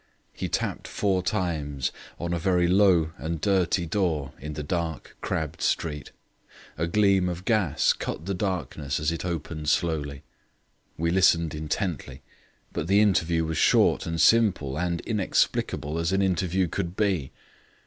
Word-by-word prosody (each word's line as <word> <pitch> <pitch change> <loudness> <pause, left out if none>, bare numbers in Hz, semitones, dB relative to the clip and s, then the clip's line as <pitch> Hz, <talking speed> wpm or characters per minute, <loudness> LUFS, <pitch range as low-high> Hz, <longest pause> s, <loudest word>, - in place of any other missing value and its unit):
He - - -4
tapped - - -2
four 95 -3 0
times 80 -8 -2 0.3
on 85 0 -2
a 85 - -1
very 90 0 +2
low 90 -4 +4
and 80 0 -3
dirty 95 -2 +1
door 80 -6 -1
in 75 +2 -6
the 75 - -5
dark, 80 0 -3
crabbed 80 0 -3
street. 75 -3 -1 0.6
A 85 +2 -1
gleam 95 -1 +3
of 90 +1 -6
gas 100 - +2
cut 80 - -5
the 100 - -2
darkness 90 -7 -2
as 75 +1 0
it 85 - -4
opened 80 -3 -3
slowly. 75 -4 -1 0.7
We 85 +1 0
listened 85 -3 +3
intently, 75 -3 -3 0.5
but 75 - -3
the 100 +2 +4
interview 85 -6 +2
was 80 0 -2
short - - +4
and 85 0 -2
simple 95 -9 +3
and 85 +1 -1
inexplicable 90 -7 0
as 85 +2 0
an 95 +1 +2
interview 95 0 +1
could 85 +1 -3
be. 95 -10 0
85 Hz, 150 wpm, -26 LUFS, 80-95 Hz, 0.7 s, low